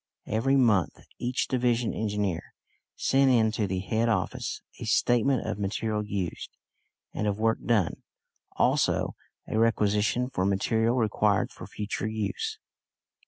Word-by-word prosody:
Every 115 +6 +1
month 110 -9 +3 0.2
each 125 +2 -1
division 120 -2 +1
engineer 105 -5 -1 0.5
sent 135 0 +3
in 115 -4 +4
to 110 -2 -1
the 95 0 -2
head 110 +4 0
office 115 - -2 0.2
a - - -5
statement 120 +2 +2
of 110 -1 -3
material 105 +1 -1
used, 100 -4 -4 0.6
and 105 - -1
of 100 -1 0
work 115 0 +2
done; 105 -9 +1 0.5
also - - +2 0.3
a 110 - -1
requisition 110 +2 +2
for 95 - -1
material 110 +4 +1
required 105 -4 +1
for - - -10
future 105 +1 -4
use. 110 - -3
110 Hz, 130 wpm, -27 LUFS, 105-120 Hz, 0.6 s, in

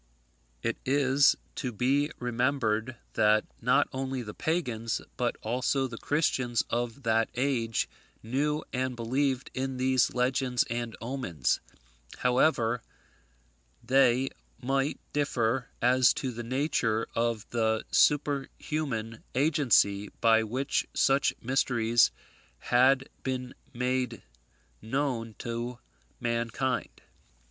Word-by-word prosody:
It - - -1
is 140 +1 +4 0.2
to 130 -4 -3
be 135 +6 +1
remembered 120 -1 0 0.2
that 105 0 +3 0.2
not 125 +3 +3
only 130 -1 -3
the 105 -2 -7
pagans, 120 -9 -1 0.2
but - - 0
also 130 +4 0
the 120 -3 -6
Christians 130 -6 +1
of 120 +3 -2
that 115 -1 +2
age, 125 -4 0 0.4
knew 150 +6 0
and 130 0 -1
believed 130 +3 -1
in 130 0 -3
these 130 -1 +2
legends 125 0 +1
and 120 -1 -3
omens, 115 - -1 0.6
however 125 -2 +2 1.0
they 130 0 +3 0.3
might 135 +2 0
differ 125 -4 0
as 125 0 +5
to 130 - -2
the 120 0 -6
nature 120 -3 0
of 115 -2 -1
the 110 -1 +1
superhuman 140 -5 0
agency 125 - +3
by 115 -1 +5
which 125 +5 -1
such 135 +1 +3
mysteries 120 -2 +3 0.5
had 130 +2 +3
been 125 -1 -3 0.2
made 125 -1 -1 0.6
known 115 -3 -2
to 120 +1 -4 0.4
mankind. 120 +2 -2
125 Hz, 105 wpm, -29 LUFS, 115-135 Hz, 1.0 s, as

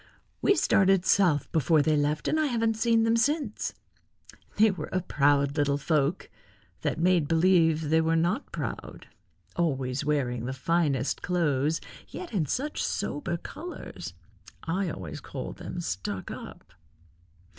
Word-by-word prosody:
We 400 - +4
started 195 - +3
south 175 -9 +3
before 155 0 +3
they 155 0 +2
left 150 +1 0
and 315 - +2
I 310 - +2
haven't 230 -3 +1
seen 225 0 +2
them 225 0 +3
since. 270 -1 0 0.8
They 215 0 +5
were 170 -5 -6
a 185 - 0
proud 140 -3 +2
little 145 -2 +2
folk, 150 +2 0 0.5
that - - -1
made 175 -3 +3
believe 165 -2 +3
they 160 0 +5
were 160 0 +1
not 175 - 0
proud, - - -6 0.5
always 135 -5 -1
wearing 130 -5 -1
the 130 - -3
finest 140 -2 0
clothes, 155 -4 +1 0.3
yet 360 - -8
in 170 -8 0
such 290 - -2
sober 225 -12 -2
colors. 345 - -8 0.5
I 180 +2 -1
always 80 - -7
called - - -7
them 180 - -6
stuck 95 - -4
up." 90 - -10
165 Hz, 140 wpm, -28 LUFS, 145-195 Hz, 0.8 s, They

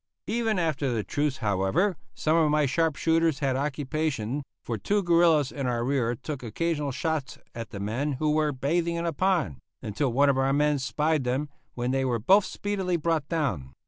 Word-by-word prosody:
Even 225 -2 0
after 155 -6 0
the 110 -3 -1
truce, 145 +1 -1
however, 105 - +1 0.2
some 155 +1 +1
of 160 -2 +4
my 150 0 +3
sharp 160 +3 +1
shooters 165 -2 +2
had 135 -2 0
occupation, 140 -2 -2 0.2
for 115 - -3
two 200 - 0
guerillas 165 -5 +4
in 140 -2 -3
our 120 -1 0
rear 125 -3 +1
took 140 +3 -6
occasional 150 +5 -2
shots 155 0 -2 0.2
at 115 0 -6
the 100 - -7
men 120 +9 -1
who 150 +3 0
were 155 0 +2
bathing 165 +6 0
in 170 0 -2
a 165 - -1
pond, 175 - +1 0.3
until 125 +6 -1
one 140 +4 +4
of 135 - -1
our 135 +1 +2
men 150 0 +2
spied 150 +2 0
them, 130 +4 -1 0.3
when 125 +1 -1
they 135 0 +1
were 125 -3 +1
both 190 - +4
speedily 190 -3 -2
brought 160 -3 -1
down. 125 - -2
145 Hz, 190 wpm, -27 LUFS, 130-165 Hz, 0.3 s, of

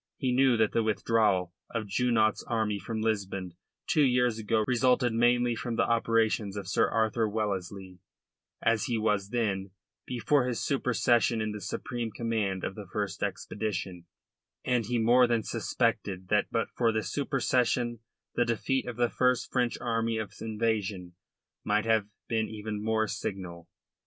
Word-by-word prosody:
He 130 - 0
knew 130 -1 +4
that 110 -1 +2
the 115 - +2
withdrawal 105 -4 +1 0.2
of 115 -2 -3
Junot's 110 +1 +1
army 110 -3 -1
from 110 +3 -4
Lisbon 95 -4 -2 0.3
two 170 -4 +2
years 125 -4 +3
ago 110 0 +1
resulted 125 0 +2
mainly 120 +1 +3
from 120 0 -3
the - - +2
operations 115 -3 +1
of 100 -3 -5
Sir 95 - +2
Arthur 110 0 +1
Wellesley 95 -3 -4 0.6
as 115 -2 +2
he 120 - -1
was 105 -2 0
then 100 -5 -1 0.4
before 125 +2 +1
his 120 -2 -2
supersession 120 -3 +2
in 110 0 -1
the 105 -1 -6
supreme 120 +2 -4
command 105 -5 -2
of - - -2
that 100 -2 -9
first 105 -1 -3
expedition, 90 -5 -3 0.6
and 125 -4 +1
he 120 - 0
more 120 +2 +5
than 115 -2 +1
suspected 95 -2 -1
that 105 -1 +3
but 115 -1 -1
for 115 -2 +2
that 110 -1 -1
supersession 125 -4 0 0.3
the 120 - +2
defeat 120 +3 -1
of 125 - -4
the 120 +1 +2
first 125 -1 +1
French 125 -2 +1
army 115 -1 -1
of 105 -2 -4
invasion 105 -5 -2 0.5
might 105 +1 +1
have 110 -2 +2 0.2
been 110 -2 0
even 105 -1 -5
more 110 0 +1
signal. 95 -5 -5
110 Hz, 155 wpm, -29 LUFS, 105-120 Hz, 0.6 s, more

